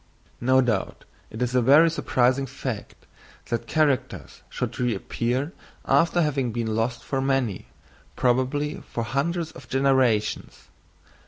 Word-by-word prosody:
No 130 +2 +4
doubt 115 -6 -2 0.2
it 110 +3 -4
is 125 0 -2
a 125 - +3
very 145 +7 +6
surprising 130 -3 +1
fact 130 -4 -6 0.4
that 115 0 -2
characters 150 -2 -1
should - - -4
reappear 125 - -1 0.3
after 170 +1 +3
having 135 -5 0
been 110 -1 -2
lost 115 +1 -1
for 135 -1 -2
many, 130 - -1 0.5
probably 130 +4 0
for 115 - -2
hundreds 160 +7 -1
of 130 -2 -14
generations. 130 -5 +1
130 Hz, 120 wpm, -25 LUFS, 120-140 Hz, 0.5 s, very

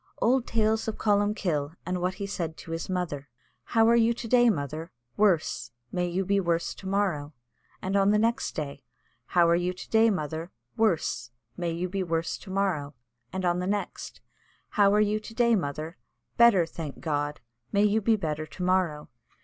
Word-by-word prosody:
Old 250 +1 +2
tales 220 0 +1
of 220 - -3
Columkill, 200 -8 +1
and 180 0 -2
what 180 +1 0
he 200 0 -4
said 170 -5 -4
to 165 - -10
his 165 +2 -4
mother. 160 -7 -3 0.4
"How 225 -1 +3
are 235 - +6
you 235 0 +4
to 235 - -6
day, 240 0 +5
mother?" 155 -2 -3 0.2
"Worse!" 165 - +2 0.2
"May 180 -1 0
you 185 +2 -1
be 200 +1 +2
worse 170 -2 0
to 190 - -10
morrow;" 180 -7 0 0.5
and 190 +1 -1
on 195 0 +4
the 210 - +4
next 230 +4 0
day, 145 -3 -5 0.4
"How 175 -1 +4
are 170 - +4
you 180 +1 0
to 180 - -10
day, 225 0 +5
mother?" 160 -3 -3 0.3
"Worse!" 215 - +1 0.3
"May 175 -1 -2
you 170 +2 -2
be 195 +2 -2
worse 165 -2 -1
to - - -12
morrow;" 180 -8 -1 0.4
and 190 -1 -3
on 175 0 +2
the 180 - -2
next, 205 +1 -4 0.5
"How 200 -1 +4
are 210 - +4
you 210 0 +2
to 225 +1 -11
day, 235 -1 +4
mother?" 155 -1 -3 0.4
"Better, 230 -7 +6
thank 160 -3 -7
God." 145 -2 -2 0.3
"May 200 0 +3
you 210 +1 +3
be 225 +2 +3
better 155 -5 -3
to 180 - -7
morrow." 180 -5 +1
185 Hz, 190 wpm, -27 LUFS, 165-210 Hz, 0.5 s, are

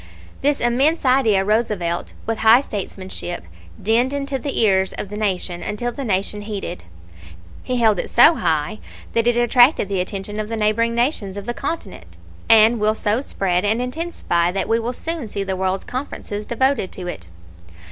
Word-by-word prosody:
"This 285 +1 +2
immense 270 +7 +2
idea 230 -7 +3
Roosevelt, 210 -6 -1
with 225 -1 -2
high 225 +3 +6
statesmanship, 190 - -5 0.4
dinned 235 +6 +1
into 280 -1 -2
the 280 +2 -1
ears 190 -4 +3
of 200 - -4
the 210 - -6
Nation 185 -4 -2
until 210 +6 -3
the 275 - -6
Nation 205 -1 -1
heeded. 205 - -6 0.8
He 255 - -2
held 220 -4 +3
it - - -3
so 245 +8 +7
high 160 - -1 0.3
that 230 0 +1
it 240 0 +3
attracted 240 - +4
the 195 -2 0
attention 200 +3 -4
of 215 0 -3
the 225 - -3
neighboring 225 +2 +1
nations 235 -6 -1
of 200 - -6
the 240 - -2
continent, 185 - -6 0.3
and 225 +1 +6
will 215 +1 +2
so 220 +3 0
spread 185 -9 -1
and 215 +3 +1
intensify 250 - -1
that 195 - -2
we 225 +1 +2
will 230 +2 -2
soon 325 -1 -4
see 200 -1 -3
the 190 -1 -3
world's 190 0 -1
conferences 210 -5 -6
devoted 255 -4 0
to 185 - -7
it. 85 - -6
215 Hz, 175 wpm, -21 LUFS, 195-240 Hz, 0.8 s, so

